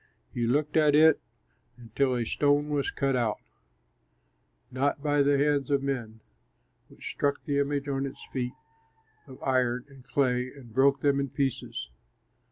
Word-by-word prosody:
You 120 -1 -1
looked 150 +5 +1
at 150 -2 +5
it 160 +1 +6 0.6
until 125 +3 -1
a 120 -1 -1
stone 145 +4 +1
was 145 -2 0
cut 135 -1 0
out, 115 -4 0 1.3
not 140 +2 -1
by 145 -1 +2
the 140 0 +3
hands 145 0 +1
of 140 -1 +1
men, 120 -5 -4 0.7
which - - -8
struck 145 0 -1
the 145 -3 0
image 140 0 -1
on 135 0 -1
its 135 - -10
feet 125 -1 -2 0.7
of 130 -1 -11
iron 125 -1 +1
and 135 -2 -16
clay 125 -1 0
and 125 -5 -14
broke 135 +2 +3
them 140 -1 +2
in 140 0 -1
pieces. 130 - -3
140 Hz, 155 wpm, -28 LUFS, 125-145 Hz, 1.3 s, it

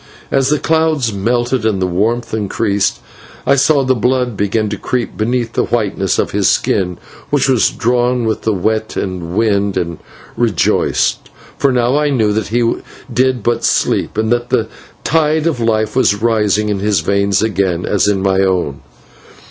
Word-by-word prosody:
As 135 -1 +2
the 150 - +2
clouds 160 -7 +1
melted 120 +4 0
and 110 -3 0
the 95 - +1
warmth 115 +7 -1
increased, 100 -1 -1 0.4
I - - +4
saw 140 +1 +3
the 130 0 +2
blood 125 0 0
begin 105 +2 0
to 105 - -4
creep 125 -2 -2
beneath 115 +1 -1
the - - +1
whiteness 100 -5 -1
of - - 0
his - - +2
skin, 90 -2 0 0.3
which 145 -2 +2
was 130 -4 +3
drawn 120 0 0
with 110 -1 -1
the 110 - 0
wet 110 +3 -1
and 90 -2 -4
wind, 100 -3 +1
and 85 -2 -3 0.4
rejoiced, 115 -7 0 0.3
for 140 - +1
now 125 +2 +1
I 150 0 +1
knew 110 -7 +1
that 110 0 -1
he 115 +1 +1 0.4
did 130 -2 +1
but 120 +1 0
sleep, - - 0
and 110 +1 0
that 120 0 0
the 115 -2 0 0.3
tide 155 0 +1
of 160 -7 0
life 110 -1 0
was 130 -6 +3
rising 105 -2 +1
in 100 -2 -1
his 100 -3 +1
veins 100 +3 +1
again, 95 -5 0
as 100 -1 +1
in 100 -2 +1
my 95 -1 +2
own. 90 -8 0
110 Hz, 170 wpm, -15 LUFS, 100-125 Hz, 0.4 s, I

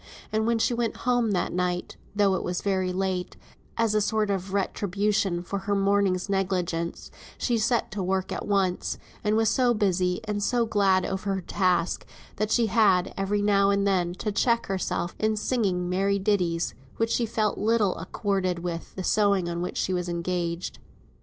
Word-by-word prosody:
And 220 +1 +1
when 235 0 +2
she 225 - +1
went 235 -1 -1
home 240 -5 +2
at 180 - -1
night 180 0 -1 0.2
(though 200 -2 +3
it 190 - 0
was 180 0 -3
very 190 -2 0
late, 185 -1 -2 0.4
as 230 -2 +2
a 215 - +3
sort 215 0 +1
of 190 -1 -3
retribution 200 -1 0
for 200 +2 -3
her 200 +1 -1
morning's 195 -2 +2
negligence), 180 -4 -2 0.3
she 240 -2 0
set 235 +2 +1
to 200 - -3
work 190 0 -1
at - - -4
once, 190 -3 0 0.3
and 210 +1 +2
was 225 -1 +3
so 245 -2 +3
busy, 185 -3 +1
and 210 -1 -2
so 235 +3 +2
glad 195 -4 +2
over 195 +1 -2
her 190 - -3
task, 180 -1 0 0.3
that 215 +1 0
she 235 +1 +3
had, 200 -4 +3
every 205 +1 0
now 200 -1 +4
and 200 0 +2
then, 180 -3 +1
to 210 - -3
check 235 +3 +2
herself 185 -2 -2
in 215 0 +1
singing 195 -7 0
merry 195 +2 +1
ditties, 180 -4 0 0.2
that 225 0 0
she 235 - +1
felt 215 -1 0
little 215 -3 +2
accorded 185 +1 -1
with 170 -1 -5
the 185 - -4
sewing 200 -3 +2
on 170 0 -3
which 180 - -4
she 185 - 0
was 180 -1 -2
engaged. 170 0 -3
195 Hz, 180 wpm, -26 LUFS, 180-210 Hz, 0.4 s, now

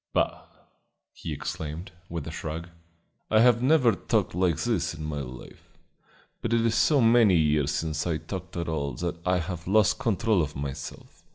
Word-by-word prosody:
"Bah!" - - 0 0.7
he - - -7
exclaimed, 80 +4 -5 0.2
with 85 -3 -4
a 80 - -5
shrug. 80 +2 -5 0.6
"I 110 0 +5
have 120 -1 +5
never 130 -3 +5
talked 95 - 0
like 90 -2 +1
this 90 -9 -1
in 75 0 -6
my 75 -1 -3
life, 65 -1 -11 0.6
but 115 - -1
it 115 - +3
is 115 - +2
so 145 +2 +4
many 115 -4 +5
years 75 -3 +2
since 80 +1 -2
I 80 -2 0
talked 90 +1 -7
at 85 - -2
all 70 -3 -2
that 85 -1 -3
I 90 0 +3
have 85 -1 -5
lost 105 +4 +3
control 110 -5 +2
of 75 -1 -3
myself. 70 0 -7
85 Hz, 175 wpm, -27 LUFS, 75-110 Hz, 0.7 s, I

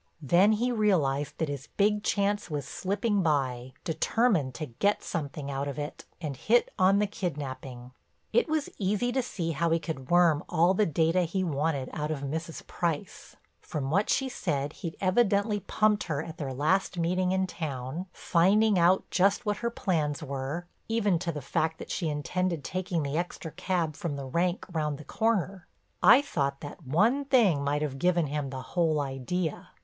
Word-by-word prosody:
Then 180 +9 +5
he 240 +4 +1
realized 160 - +1
that 160 - -1
his 140 0 -5
big 210 +1 +3
chance 205 -1 0
was 145 -3 -3
slipping 205 +5 0
by, 130 -6 0
determined 160 - +1
to 155 - -4
get 175 - 0
something 145 -3 -4
out 140 +1 -2
of 140 - -5
it, 150 +1 -6
and 150 -5 -4
hit 235 - +2
on 190 +2 +5
the 210 - +3
kidnaping. 135 - -5 0.4
It 475 -8 +3
was 310 -2 0
easy 210 +5 +1
to 260 +1 +1
see 175 -9 -3
how 165 +2 0
he 165 - +3
could 155 -5 -6
worm 175 -4 +4
all 175 +1 +4
the 210 +2 +2
data 165 +3 +2
he 180 +2 -1
wanted 145 -4 -1
out 150 0 -2
of 155 -3 -3
Mrs. 160 +4 -4
Price. 170 -4 -3 0.2
From 140 -2 -4
what 200 +6 +2
she 270 - +2
said 150 - -2
he'd 170 -4 -6
evidently 205 +1 +2
pumped 210 +2 +1
her 150 -3 -2
at 165 0 -9
their 140 -3 -3
last 165 +8 +1
meeting 180 +2 +1
in 190 0 +2
town, 155 -1 -5
finding 195 +5 +3
out 180 +3 +4
just 200 +5 +2
what 210 -1 0
her 235 - -1
plans 155 -10 -1
were, 140 +4 -4 0.2
even 210 -6 +2
to 170 -1 -2
the 150 -4 -6
fact 160 +4 0
that - - -8
she 165 -4 -1
intended 170 +2 -1
taking 185 -2 -2
the 140 +3 -1
extra 175 -2 -5
cab 170 -2 -1
from 155 -2 -3
the 140 -1 -5
rank 170 +7 0
round 150 -3 -1
the 150 - -10
corner. 200 -5 -1 0.3
I 240 +9 +7
thought 140 - -2
that 145 0 -9
one 220 - +3
thing 215 - +4
might 145 +1 0
have 135 -2 -3
given 175 -1 +2
him 145 -1 -3
the 130 -1 -6
whole 165 -4 +1
idea. 145 +5 -3
170 Hz, 180 wpm, -28 LUFS, 145-195 Hz, 0.4 s, I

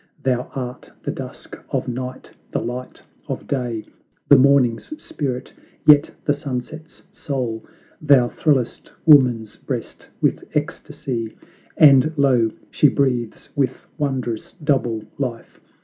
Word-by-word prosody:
Thou 125 -1 0
art 125 -2 -6
the - - -2
dusk - - -9
of - - -2
Night, 125 +1 -5 0.2
the - - +1
light 125 +2 -6 0.2
of - - -4
Day, 120 -5 -2 0.4
The 145 - +10
Morning's 135 - +3
spirit, 135 - -4 0.3
yet 150 0 +7 0.2
the 145 - +3
Sunset's 145 +3 -6
soul. 125 -6 -3 0.4
Thou 140 -5 +5
thrillest 135 -6 0
woman's 125 -8 +5
breast - - -6
with - - +1
ecstacy 115 -4 -3 0.4
And 145 0 +7
lo! 130 -5 +4 0.2
she 150 - +5
breathes 125 -5 -1
with 135 -3 -1
wondrous 130 -6 -2
double 130 -9 0 0.2
life. 125 -4 -4
130 Hz, 115 wpm, -21 LUFS, 120-145 Hz, 0.4 s, The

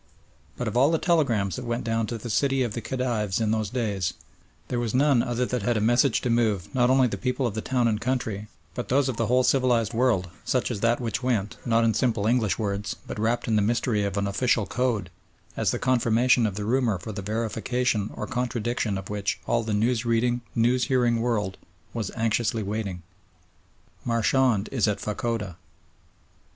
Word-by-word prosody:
But - - -3
of - - -3
all 130 +4 +5
the 165 - +2
telegrams 130 - +1
that 125 - -6
went 120 0 -2
down 115 -1 0
to 120 - -4
the 115 +1 -6
city 135 +3 +2
of 120 -4 -3
the 115 - -4
Khedives 115 -7 -1
in 110 -1 +1
those 110 -2 0
days, 105 -7 -2 0.5
there 120 - -2
was 120 -1 -2
none 135 -2 +4
other 120 +1 -1
that 125 -1 -2
had 115 +3 +1
a - - +1
message 120 +4 +3
to 125 - 0
move, 110 -8 0
not 125 -1 +3
only 130 0 +5
the - - -4
people 125 +1 -1
of 115 - -1
the 110 - -3
town 125 -1 +1
and 110 -1 0
country, 115 -5 -2 0.3
but 120 - -5
those 135 +1 +2
of 125 - -3
the 115 - 0
whole 125 +1 +3
civilised 125 -5 +2
world, 115 -7 +1
such 125 -1 0
as 110 - -3
that 115 +2 +2
which 115 -2 -2
went, 115 -5 -1
not 115 0 +3
in 115 -1 +3
simple 115 -4 0
English 110 -3 +2
words, 100 -1 -2
but - - -6
wrapped 115 +2 0
in 110 - +2
the - - +3
mystery 110 0 +1
of 100 0 -2
an 100 - 0
official 110 +2 +1
code, 120 +1 -1 0.4
as - - 0
the - - 0
confirmation 120 -1 +3
of 100 - -4
the 105 0 -3
rumour 120 -3 +1
for 90 +5 -7
the 100 - -5
verification 110 +1 -1
or - - -4
contradiction 120 -3 -2
of 95 0 -7
which 105 -1 -2
all 120 - +1
the 110 -1 -4
news 115 +3 +1
reading, 120 +1 +1
news 125 +2 +2
hearing 120 -4 +2
world 105 -5 -1 0.4
was - - -3
anxiously 115 0 0
waiting. 100 -4 -4 1.0
"Marchand 115 -2 +2
is 120 -5 +1
at 105 -1 0
Fachoda." 105 -4 -3
115 Hz, 200 wpm, -26 LUFS, 105-125 Hz, 1.0 s, all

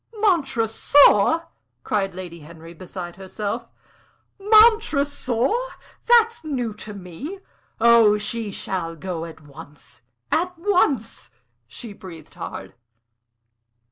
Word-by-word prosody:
"Montresor!" 290 - +3 0.4
cried 195 -3 -1
Lady 175 -2 -8
Henry, 165 +2 -13
beside 175 0 -9
herself. 210 +4 -5 0.7
"Montresor! 320 - +3 0.5
That's 460 -4 +4
new 250 -8 -3
to 210 0 -9
me. 200 - -8 0.4
Oh, 230 -2 +5
she 215 +1 -3
shall 180 -4 -4
go 170 -1 -5
at 165 -1 -12
once 145 -3 -14 0.3
at 355 +3 0
once!" 335 - 0 0.4
She 230 -4 -9
breathed 170 -6 -12
hard. 95 0 -8
215 Hz, 95 wpm, -22 LUFS, 180-295 Hz, 0.7 s, Oh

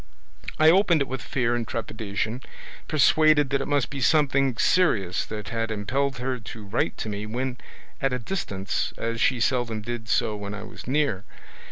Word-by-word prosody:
I 155 +1 +7
opened 180 -3 +4
it - - -8
with 130 - -4
fear 120 -3 0
and 120 -2 -2
trepidation, 110 +1 -3 0.5
persuaded 155 -1 +4
that 140 -1 +1
it - - -3
must 145 -3 +1
be 140 -2 -5
something 135 -3 +3
serious 100 - +2
that 105 -1 -6
had 115 -1 -2
impelled 130 +6 -1
her 125 +1 -2
to 110 -1 -9
write 100 +4 -1
to - - -4
me 105 0 -4
when 125 +3 -3 0.4
at 135 - +1
a 125 - 0
distance, 110 - -3
as 115 0 -2
she 130 -5 +3
seldom 115 -3 0
did 120 0 -5
so 105 - +1
when 100 0 -5
I 105 - -7
was 110 - -11
near. 135 -8 +1
120 Hz, 180 wpm, -25 LUFS, 110-140 Hz, 0.5 s, I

